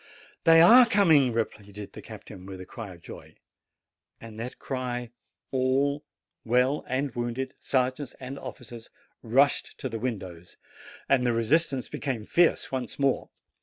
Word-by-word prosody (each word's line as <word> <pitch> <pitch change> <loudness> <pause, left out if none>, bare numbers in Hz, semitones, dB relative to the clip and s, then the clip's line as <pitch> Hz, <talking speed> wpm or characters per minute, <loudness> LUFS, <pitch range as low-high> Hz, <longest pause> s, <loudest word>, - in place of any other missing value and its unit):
'They 165 0 +7
are 235 +9 +9
coming!" 160 - +4
repeated 105 -3 -5
the - - -9
captain, 90 0 -11
with 95 -1 -8
a 95 - -8
cry 100 -4 -9
of 85 - -20
joy. - - -11 0.8
At 115 -1 -11
that 120 +3 -6
cry 125 -3 -4 0.4
all, 135 +2 +1 0.4
well 125 +5 +2
and 130 +1 -2
wounded, 120 +2 -3
sergeants 130 +1 -1
and 135 +1 -7
officers, 120 -2 -10 0.3
rushed 135 +5 +2
to - - -4
the 115 -1 -5
windows, 95 -8 -6 0.5
and 135 -2 +3
the 120 -1 +2
resistance 130 +3 +1
became 130 -7 -4
fierce 170 +6 +2
once 130 -2 -4
more. 140 -2 0
125 Hz, 140 wpm, -27 LUFS, 115-140 Hz, 0.8 s, are